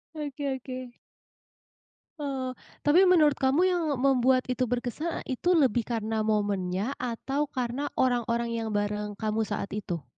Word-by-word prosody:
Oke 290 -1 -4
oke. 255 -1 -7 1.3
Oh, 265 -3 -3 0.3
tapi 360 +5 +6
menurut 305 -5 +6
kamu 270 +5 +2
yang 355 -2 +2
membuat 255 -1 +3
itu 255 -1 -1
berkesan 250 +7 -3
e 260 - -2
itu 350 +8 -1
lebih 250 -5 +3
karena 220 -1 -2
momennya 205 +1 0
atau 270 +4 -2
karena 255 +3 -2
orang-orang 235 -2 +1
yang 225 -1 -2
bareng 205 0 -2
kamu 215 0 -1
saat 200 -2 -3
itu? 180 -7 -4
250 Hz, 135 wpm, -28 LUFS, 220-275 Hz, 1.3 s, tapi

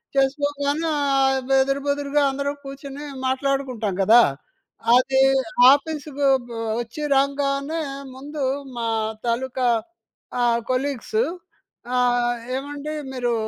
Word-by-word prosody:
చేసుకోగానే 285 +3 0
ఆహ్, 270 -1 +1
ఎదురు 275 +1 0
బొదురుగా 285 0 +1
అందరం 280 +1 -2
కూర్చొని 275 +1 -8 0.2
మాట్లాడుకుంటాం 260 -6 -1
కదా! 230 +5 +7 0.7
అది 265 +1 +3 0.5
ఆఫీస్‌కి 300 -1 -3
వ - - +6 0.5
వచ్చి 240 +6 -8 0.2
రంగానే 280 +3 0 0.3
ముందు 285 +2 -6 0.3
మా 230 -1 -2 0.4
తాలూకా 255 +1 0 0.7
ఆహ్, 235 -1 +3
కొలీగ్స్ 280 - -1 0.8
ఆహ్, 245 -1 +2 0.2
ఏమండి 290 +2 -5 0.2
మీరు 245 -2 -1
275 Hz, 95 wpm, -23 LUFS, 255-285 Hz, 0.8 s, కదా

